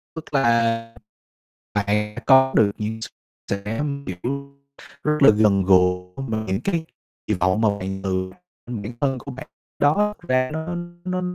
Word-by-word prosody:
Tức 160 -1 -9
là 115 -3 +2 0.8
bạn 105 +1 0
có 130 0 +6
được 105 -2 +5
những 110 +1 -3 0.5
sự 100 0 -2
am 140 +6 -3
hiểu 140 +9 -5 0.5
rất 150 0 +2
là 135 - +9
gần 105 -2 +4
gũi 90 -1 +4 0.2
mà 110 0 -2
những 95 +1 -1
cái 170 -5 -1 0.4
kỳ 105 - +1
vọng 95 +3 +1
mà 110 - +4
bạn 95 0 -4
từ 95 -1 -1 0.4
bản 115 -2 -5
thân 135 -2 +1
của 140 - -8
bạn 130 0 -8 0.3
đó 205 +9 +3
ra 130 0 +2
nó 160 +3 -4 0.3
nó 185 0 -1
115 Hz, 155 wpm, -23 LUFS, 100-140 Hz, 0.8 s, là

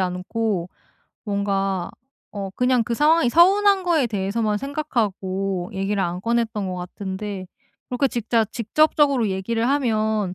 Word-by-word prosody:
않고 185 +1 -2 0.6
뭔가 195 -3 -1 0.4
어 200 -2 -5
그냥 250 -1 +2
그 235 - -3
상황이 310 +2 +4
서운한 390 +5 +5
거에 325 -7 +2
대해서만 210 0 -1
생각하고 195 -9 -2
얘기를 195 +1 -1
안 175 0 -2
꺼냈던 230 -2 -1
것 185 - -3
같은데 190 +2 -6 0.4
그렇게 250 +2 +1
직자 230 -1 +1
직접적으로 265 +2 +2
얘기를 225 +5 -1
하면 220 -8 0
215 Hz, 290 characters per minute, -22 LUFS, 195-250 Hz, 0.6 s, 서운한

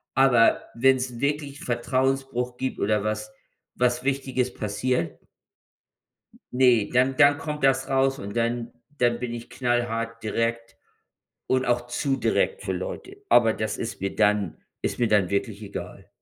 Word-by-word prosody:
aber 125 -3 +5
wenn 130 +3 +4
es 125 -2 -4
wirklich 145 0 -2
Vertrauensbruch 130 0 -1
gibt 130 +1 -3
oder 105 0 +1
was 110 0 -3 0.4
was 125 0 +1
Wichtiges 130 -2 -1
passiert 105 -2 -2 1.4
ne, 125 -5 +4
dann 130 +2 +3
dann 145 +2 +5
kommt 150 -1 -5
das 135 0 +2
raus 135 0 +2
und 100 +1 -7
dann 115 0 -1 0.3
dann 120 -2 +2
bin 125 -1 -4
ich 120 0 -8
knallhart 115 -2 -2
direkt 115 +1 -2 0.7
und 130 0 +1
auch 120 0 0
zu 135 +3 -1
direkt 475 - 0
für - - -2
Leute. 400 -6 -6
Aber 115 -2 +5
das 110 -1 -3
ist 115 0 -5
mir 95 0 -2
dann 105 -4 +2 0.2
ist - - -2
mir 120 - +2
dann 100 -4 +3
wirklich 100 +1 -2
egal. 100 -2 -8
120 Hz, 150 wpm, -25 LUFS, 115-135 Hz, 1.4 s, aber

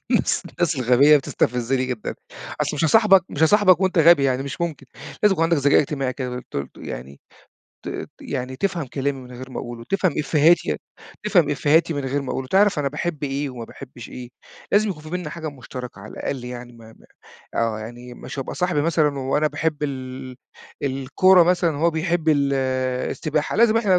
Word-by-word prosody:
الناس - - +2
الناس 170 -2 0
الغبية 130 +4 +5
بتستفزني 125 -1 0
جدًا. 125 -4 -4 0.5
أصل - - -1
مش 150 - 0
هاصاحبك 195 +1 +5
مش 145 - -2
هاصاحبك 185 +1 +5
وأنت 185 -2 +1
غبي 165 -3 +6
يعني 130 -1 +1
مش 140 +4 -6
ممكن. 160 -5 -3 0.4
لازم 210 -1 +5
يكون 165 -4 0
عندك 165 0 +2
ذكاء 145 0 +4
اجتماعي 135 -3 -2
كده 125 -1 -4
ت - - -6
ت 70 - -3
يعني 65 +3 -8 0.7
ت - - -5
يعني 130 +1 -4
تفهم 170 0 -1
كلامي 135 +2 -2
من 125 -1 -12
غير 130 +2 -9
ما - - -6
أقوله، 120 -1 -7
وتفهم 185 +8 0
إفّيهاتي 155 +3 +3 0.5
تفهم 180 -8 +3
إفّيهاتي 155 +3 +2
من 145 -1 -3
غير 140 +2 -1
ما 135 - -5
أقوله. 130 - -3
تعرف 200 -2 +4
أنا 145 -1 0
باحب 150 +2 -4
إيه 140 0 -2
وما 120 -2 -7
باحبش 125 0 -11
إيه، 125 -1 -8 0.4
لازم 210 +1 +3
يكون 150 -5 -7
في 155 - -10
بيننا 180 -4 -4
حاجة 160 -1 -5
مشتركة 125 -5 -9
على 110 - -10
الأقل 130 -3 -4
يعني 125 0 -8
ما 115 -1 -15
ما - - -20 0.5
آه. 115 -2 0
يعني 120 +2 -9
مش 140 - -9
هابقى 135 - -4
صاحبي 180 -5 0
مثلًا 150 -3 +1
وأنا 135 +3 +1
باحب 155 0 -2
ال 130 -2 -5 0.5
الكورة 140 +7 +4
مثلًا 170 -2 +2
وهو 165 +3 +2
بيحب 165 0 -1
ال 140 -2 +3 0.6
السباحة، 155 +1 -2
لازم 225 0 +5
إحنا 200 -5 +3
145 Hz, 190 wpm, -22 LUFS, 130-170 Hz, 0.7 s, غبي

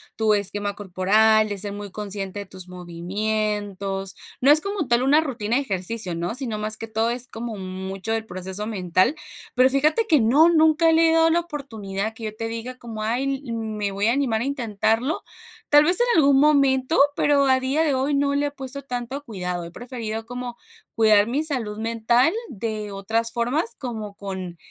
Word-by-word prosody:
tu 220 -1 +2
esquema 205 0 0
corporal, 210 +3 +3
de 205 - -3
ser 200 +1 -2
muy 205 -1 -7
consciente 200 -1 -4
de 200 - -6
tus 185 -1 -10
movimientos. 195 +2 -3 0.2
No 275 +3 +5
es 305 +1 +6
como 395 -8 -3
tal, 240 +1 +2
una 285 +3 +5
rutina 240 -6 -1
de 280 - +1
ejercicio, 190 -3 -1
¿no?, 175 +5 -3
sino 250 -5 -2
más 215 +1 0
que 225 - -7
todo, 225 +1 0
es 245 +1 -2
como 225 -1 -6
mucho 190 +2 -5
del 225 0 -2
proceso 190 +1 -5
mental. 185 - +1 0.4
Pero 255 +1 +5
fíjate 305 - +2
que 305 - +4
no, 275 +9 +5
nunca 320 0 +4
le 325 0 +5
he - - +3
dado 325 0 +4
la 335 +1 +3
oportunidad. 220 - -5
Que 225 - -11
yo 215 0 -5
te 225 +1 -4
diga 230 +3 -6
como: 225 -3 -7
"Ay, 265 +5 -1
me 215 -3 -3
voy 200 +2 0
a 230 - +3
animar 250 -5 0
a - - -1
intentarlo". 245 - -1 0.5
Tal 295 0 +7
vez 355 +7 +5
en 485 - +3
algún 280 -3 +5
momento, 280 0 +3 0.2
pero 285 -1 +3
al 260 -1 +4
día 270 +5 0
de 295 -3 +1
hoy, 265 +3 0
no 280 0 +1
le 285 +1 +1
he - - -5
puesto 280 0 -7
tanto 250 +2 -5
cuidado. 180 -6 -4
He 170 - -10
preferido 225 -1 -6
como 245 0 -6 0.4
cuidar 215 -2 +5
mi 280 +6 -1
salud 235 -9 -1
mental, 230 +5 +2 0.2
de 215 - -5
otras 225 +4 -1
formas. 250 - -1
Como 220 -6 -6
con, 190 -3 -6
225 Hz, 190 wpm, -23 LUFS, 205-275 Hz, 0.5 s, Tal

